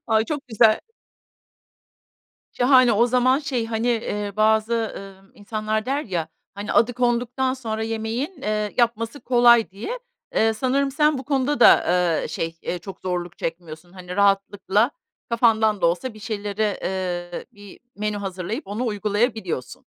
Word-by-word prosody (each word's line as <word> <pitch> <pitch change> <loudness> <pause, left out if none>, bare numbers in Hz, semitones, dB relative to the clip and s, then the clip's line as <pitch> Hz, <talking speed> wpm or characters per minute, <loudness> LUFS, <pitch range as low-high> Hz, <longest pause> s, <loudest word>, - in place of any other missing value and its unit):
Ay, 220 0 +3
çok 290 -2 -5
güzel. 220 -1 +4 1.7
Şahane, 255 -1 +5
o 235 +4 +4
zaman 255 +2 +3
şey, 265 -7 -2
hani, 225 +1 -2
eee, 210 -3 -2
bazı, 220 +1 +3 0.2
ııı, 195 0 -12
insanlar 215 +1 -3
der 280 +3 0
ya, 170 -5 -3 0.3
hani, 205 +1 -4
"Adı 240 +2 +3
konduktan 250 +2 0
sonra 220 -4 -4
yemeğin, 225 +8 -3
eee, 210 -1 -2
yapması 235 +3 0
kolay." 240 -3 +5
diye. 235 - -5 0.4
Eee, 225 0 +3
sanırım 270 +4 0
sen 300 0 +2
bu 260 - -7
konuda 275 0 0
da, - - +7 0.4
eee, - - -4
şey, 165 +1 -4
eee, 180 - -3
çok 190 +3 -10
zorluk 175 -1 -4
çekmiyorsun. 165 +1 -6
Hani, 180 0 -8
rahatlıkla 200 +3 +2 0.4
kafandan 220 -3 +3
da 170 - +3
olsa 200 +8 -1
bir - - -12
şeylere, 210 -1 -2
eee, 175 -2 -3
bir 205 -1 -14 0.2
menü 210 0 -2
hazırlayıp 195 - -5
onu 220 +5 -3
uygulayabiliyorsun. 210 - -2
220 Hz, 145 wpm, -23 LUFS, 200-245 Hz, 1.7 s, da